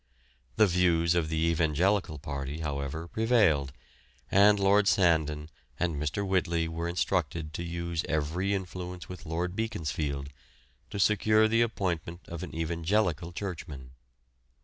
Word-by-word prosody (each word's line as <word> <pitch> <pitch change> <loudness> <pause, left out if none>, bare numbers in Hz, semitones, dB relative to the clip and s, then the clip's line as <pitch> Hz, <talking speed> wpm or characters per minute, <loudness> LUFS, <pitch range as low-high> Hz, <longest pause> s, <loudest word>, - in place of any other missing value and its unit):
The 110 - +6
views 85 -3 +3
of 85 -3 0
the 80 - -1
evangelical 85 +2 +1
party, 70 +1 -5
however, 75 +2 -3
prevailed, 100 - +2 0.6
and 100 +1 +6
Lord 100 +1 +4
Sandon 80 -6 +2 0.3
and 85 -2 0
Mr. 75 +7 -2
Whitley 85 -3 +1
were 85 +1 -3
instructed 85 -3 -1
to 85 - -4
use 85 -1 -3
every 80 +5 0
influence 90 -1 -6
with 90 -4 -9
Lord 90 +3 -2
Beaconsfield 75 -10 -3 0.6
to - - -6
secure 110 +2 +4
the 115 +1 +3
appointment 90 -6 -2
of 85 -1 -6
an 90 - -7
evangelical 85 +1 0
churchman. 80 -9 -6
85 Hz, 125 wpm, -29 LUFS, 80-95 Hz, 0.6 s, The